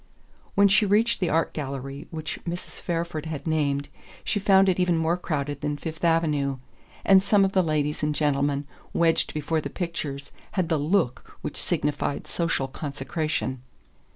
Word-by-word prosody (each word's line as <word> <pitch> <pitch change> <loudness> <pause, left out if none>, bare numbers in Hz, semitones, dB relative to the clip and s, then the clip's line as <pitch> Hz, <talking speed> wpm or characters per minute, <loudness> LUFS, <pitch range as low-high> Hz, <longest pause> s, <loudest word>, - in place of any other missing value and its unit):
When 200 0 +6
she 200 +2 +5
reached 225 +4 +3
the 180 - +1
art 165 +2 +1
gallery 135 -1 -5
which 155 -2 -5
Mrs. 175 +1 -6
Fairford 165 -2 -2
had 155 -3 -5
named 145 -3 0 0.4
she 205 - 0
found 195 -1 +5
it 185 -1 +2
even 180 -2 +3
more 160 +1 +2
crowded 145 -5 -3
than 145 0 -1
Fifth 160 +1 -6
Avenue; 150 -5 +2 0.5
and 195 -1 +7
some 200 0 +4
of 190 - 0
the 190 - +4
ladies 150 -3 0
and 150 0 0
gentlemen 145 -1 +1 0.3
wedged 165 -1 +2
before 155 +1 -1
the 140 - -4
pictures 145 -5 -4 0.2
had 185 -4 0
the 160 -3 +2
"look" 150 -5 0
which - - -4
signified 145 -1 -1
social 165 -6 -1
consecration. 140 -1 -3
155 Hz, 160 wpm, -26 LUFS, 145-175 Hz, 0.5 s, and